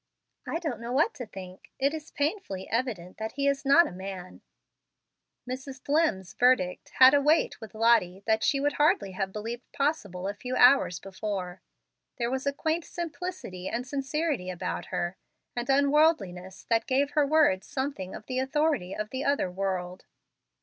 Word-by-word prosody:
"I - - -1
don't 310 -9 -4
know 235 +1 -6
what 300 - +2
to 245 -4 -7
think. 185 -2 -11
It 275 +2 +1
is 315 -1 -6
painfully 285 - -3
evident 225 -7 -2
that 220 0 -4
he 280 +1 0
is 280 0 +1
not 280 +5 +6
a - - -5
man." 185 0 -8 1.1
Mrs. 260 +1 -6
Dlimm's 285 - +1
verdict 245 -8 +2
had 260 +1 +9
a 285 - +5
weight 300 -3 +2
with 220 -1 -10
Lottie 215 -5 +3
that 220 0 +2
she 275 - +2
would 290 +1 +1
hardly 215 -10 +2
have 190 +1 -3
believed 230 +4 -6
possible 205 - -1
a 200 - -2
few 250 +5 -5
hours 245 -8 +5
before. 190 -2 -5 0.6
There 235 0 -1
was 265 +1 -2
a - - +3
quaint 315 +4 -1
simplicity 330 - -6
and 240 +2 -3
sincerity 275 - -2
about 180 -1 -4
her, 175 +2 -3 0.4
an 240 0 -2
unworldliness, 270 - +2
that 230 -1 +1
gave 275 +2 +1
her 295 -2 +2
words 290 -11 +3
something 265 -9 -4
of - - -10
the 255 0 -2
authority 265 - 0
of 215 0 -4
the 260 +1 -3
other 280 -10 +1
world. 185 -1 -3
250 Hz, 170 wpm, -28 LUFS, 190-285 Hz, 1.1 s, had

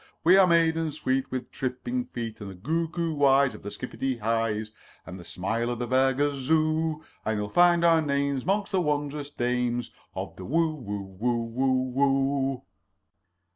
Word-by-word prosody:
We 175 +3 +7
are 190 -1 +7
maidens 165 -2 +2
sweet 130 0 0
With 130 -1 -5
tripping 135 - -3
feet, 115 - -6
And 100 - -6
the 95 - -9
googoo 165 - -2
eyes 135 -1 +5
Of - - -11
the 100 - -6
skippity 130 +2 -4
hi's, 110 -1 -1 0.3
And 95 0 -8
the - - -10
smile 110 +7 -2
of 120 - -2
the 120 +1 -3
fair 130 +1 +3
gazoo; 155 +3 +1 0.2
And 110 0 -1
you'll 105 0 -3
find 175 +5 +4
our 165 -1 +5
names 140 -2 0
'Mongst 200 +2 0
the 190 -2 +2
wondrous 145 -2 -2
dames 120 -2 -1 0.2
Of - - -6
the 95 - -8
Who's 155 - 0
Who 100 -2 -6
hoo 115 -1 -1
hoo 130 -1 +1
hoo." 135 -1 +1
135 Hz, 170 wpm, -27 LUFS, 120-155 Hz, 0.3 s, We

